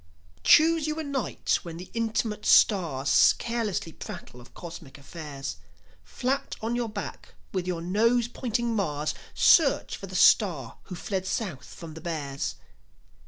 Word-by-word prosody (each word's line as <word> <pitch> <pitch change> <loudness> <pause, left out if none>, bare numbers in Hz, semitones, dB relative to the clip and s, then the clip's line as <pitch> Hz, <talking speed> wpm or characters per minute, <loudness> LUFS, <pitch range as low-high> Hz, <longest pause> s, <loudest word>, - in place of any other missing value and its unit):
Choose 320 0 +5
you 305 0 -2
a - - -2
night 280 -5 -1
when 165 -1 -8
the 180 +1 -10
intimate 220 -2 -1
stars 155 -9 +4
Carelessly 225 -8 -2
prattle 125 -5 -9
of 120 - -18
cosmic 160 -5 -10
affairs. 140 -2 -7 0.5
Flat 270 +2 -2
on 230 +2 -2
your 240 -2 -1
back, 210 -1 -7 0.2
with 185 -2 -2
your 170 -2 -2
nose 230 +6 +2
pointing 240 -1 -2
Mars, 155 -7 -1 0.2
Search 305 -5 +4
for 195 - -8
the 185 - -9
star 165 - +3
who 180 - -7
fled 190 +1 -3
South 185 - -4
from 165 -3 -9
the 160 - -10
Bears. 145 -5 -3
190 Hz, 145 wpm, -27 LUFS, 160-235 Hz, 0.5 s, Choose